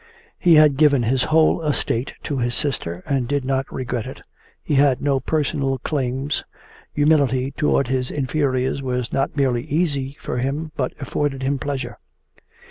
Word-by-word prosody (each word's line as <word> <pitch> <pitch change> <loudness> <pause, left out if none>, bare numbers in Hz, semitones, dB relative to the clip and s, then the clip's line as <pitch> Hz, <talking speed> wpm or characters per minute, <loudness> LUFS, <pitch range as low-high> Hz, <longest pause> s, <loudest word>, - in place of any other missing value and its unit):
He 170 -2 +5
had 150 -3 +6
given 145 -4 +4
his 125 +2 +1
whole 160 +1 +3
estate 140 -5 -1
to 140 -3 -2
his 120 0 0
sister 90 - -2
and 135 -4 0
did 140 0 -1
not 135 0 -1
regret 125 -3 -3
it, - - -9 0.4
he - - -2
had 135 -2 +4
no 140 -1 +1
personal 135 -1 -1
claims, 135 +1 -2 0.5
humility 140 -3 +2
towards 140 -2 +1
his 130 -1 0
inferiors 135 -1 0
was 125 -2 -3
not 135 +2 -1
merely 130 -4 +2
easy 140 -4 -1
for 125 - -3
him 145 +5 -2
but 130 -4 -2
afforded 140 0 -2
him 135 +1 0
pleasure. 140 -1 -4
135 Hz, 155 wpm, -22 LUFS, 130-145 Hz, 0.5 s, had